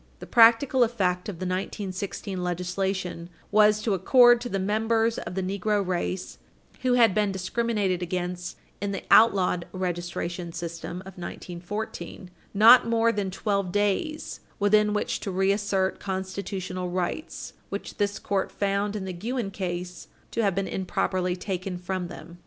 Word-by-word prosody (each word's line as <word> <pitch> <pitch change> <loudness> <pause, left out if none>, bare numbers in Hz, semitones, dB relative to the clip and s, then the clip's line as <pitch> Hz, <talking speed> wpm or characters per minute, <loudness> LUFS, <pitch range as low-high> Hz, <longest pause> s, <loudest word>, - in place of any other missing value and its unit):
The - - -9
practical 240 +3 +5
effect 190 -6 0
of 200 - -5
the 185 +3 -5
1916 190 0 -4
legislation 180 0 -2 0.2
was 210 0 +5
to 215 - +1
accord 240 +5 +6
to 245 - -4
the 195 - -1
members 225 +3 +1
of - - -6
the 190 - -1
negro 200 +2 0
race 180 0 -3 0.4
who 255 -1 +2
had 230 -5 +5
been 210 -1 +1
discriminated 195 -1 -1
against 180 0 -3 0.2
in 200 0 -2
the 195 - -4
outlawed 185 -5 +5
registration 175 -1 -4
system 170 +1 -5
of 190 -1 -11
1914 180 +1 -6 0.2
not 230 +5 +7
more 230 0 +3
than 205 -4 -2
12 200 -1 -1
days 205 - -1 0.2
within 210 +1 +3
which 210 - -1
to - - -5
reassert 195 0 +1
constitutional 190 -1 -4
rights 180 - -4 0.2
which - - -6
this 205 0 0
Court 195 -1 -1
found 200 +1 -1
in 200 -2 -3
the 185 - -4
Guinn 220 +3 -3
case 180 -2 -5 0.2
to 230 - 0
have 200 -4 +1
been 195 0 -1
improperly 185 -1 -1
taken 185 -1 -4
from 180 0 -3
them. 175 0 -11
195 Hz, 145 wpm, -26 LUFS, 180-210 Hz, 0.4 s, not